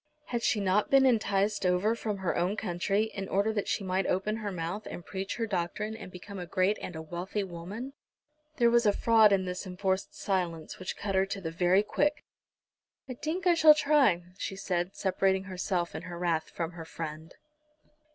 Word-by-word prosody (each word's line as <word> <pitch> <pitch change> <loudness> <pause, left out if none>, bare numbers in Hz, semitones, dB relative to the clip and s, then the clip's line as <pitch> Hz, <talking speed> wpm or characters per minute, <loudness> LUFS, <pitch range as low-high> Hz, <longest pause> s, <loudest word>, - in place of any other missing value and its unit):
Had 235 -1 -1
she 225 - +2
not 200 +1 +2
been 270 -1 +6
enticed 210 -4 +2
over 180 +4 +2
from 215 -3 -3
her 190 -3 -1
own 180 +5 0
country 195 +2 0
in 195 -1 -5
order 200 +3 +1
that 205 -2 -2
she 200 0 -1
might 190 0 0
open 210 +4 0
her 210 -2 -4
mouth, 180 +4 -4
and 175 - -8
preach 195 0 -4
her 230 - -1
doctrine, 210 +2 -2
and 185 - -9
become 190 +2 -9
a 175 - -6
great 190 +3 +1
and 175 - -6
a 160 - -5
wealthy 175 +5 -3
woman? 195 +9 -7 0.6
There 235 -2 +4
was 235 -1 +4
a 205 - +5
fraud 220 -2 +5
in 190 -1 +2
this 180 +2 -4
enforced 190 +1 -2
silence 175 -5 -2
which 185 - -5
cut 200 -1 -3
her 190 0 +3
to 195 0 -4
the 165 -4 -4
very 180 +4 +3
quick. 295 +7 0 0.8
"I 255 - -4
tink 315 +9 -3
I 355 - +6
shall 315 -2 +8
try," 280 - +3 0.2
she 195 - -3
said, 180 -1 -2
separating 190 0 +1
herself 185 -2 -2
in - - -5
her 175 -1 -7
wrath 170 -2 0
from 165 0 -4
her 165 -2 -8
friend. 160 0 -7
195 Hz, 200 wpm, -29 LUFS, 180-215 Hz, 0.8 s, shall